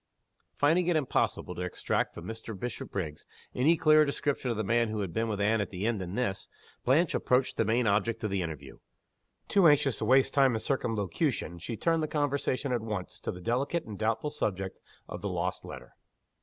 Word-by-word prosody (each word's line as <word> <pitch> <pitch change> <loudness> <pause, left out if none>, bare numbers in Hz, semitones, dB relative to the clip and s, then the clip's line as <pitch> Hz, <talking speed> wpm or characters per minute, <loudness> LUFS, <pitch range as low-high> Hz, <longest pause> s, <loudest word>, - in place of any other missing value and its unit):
Finding 165 +5 +3
it 175 - +3
impossible 135 -10 0
to 90 - -6
extract 90 -1 -1
from 85 - -8
Mr. 110 -1 -7
Bishopriggs 95 -9 -5 0.3
any 155 +7 +3
clearer 155 0 +6
description 140 -2 -1
of 115 - -1
the 110 - 0
man 115 +3 +2
who 110 -1 -2
had 95 -4 -4
been 115 +3 0
with 105 -2 -2
Anne 105 +2 +2
at 100 - -3
the 95 +2 -4
inn 115 -2 0
than 90 +1 -5
this, 110 -6 -2 0.4
Blanche 155 +6 +3
approached 125 +1 +1
the 115 - +1
main 115 +3 +2
object 110 +2 +1
of 105 - -1
the 95 -1 0
interview. 75 -5 -6 0.7
Too 195 -4 +5
anxious 140 -4 +3
to - - -1
waste 135 +1 +4
time 135 -4 +4
in - - -1
circumlocution, 105 - -1
she 110 +7 -5
turned 165 -1 +1
the 155 - 0
conversation 140 -2 -1
at 120 -2 0
once 105 -4 -5
to - - -3
the 90 - -9
delicate 135 - -1
and 105 -3 -8
doubtful 115 +7 0
subject 95 -9 -3 0.3
of - - -7
the - - -2
lost - - -2
letter. - - -10
115 Hz, 200 wpm, -29 LUFS, 100-140 Hz, 0.7 s, clearer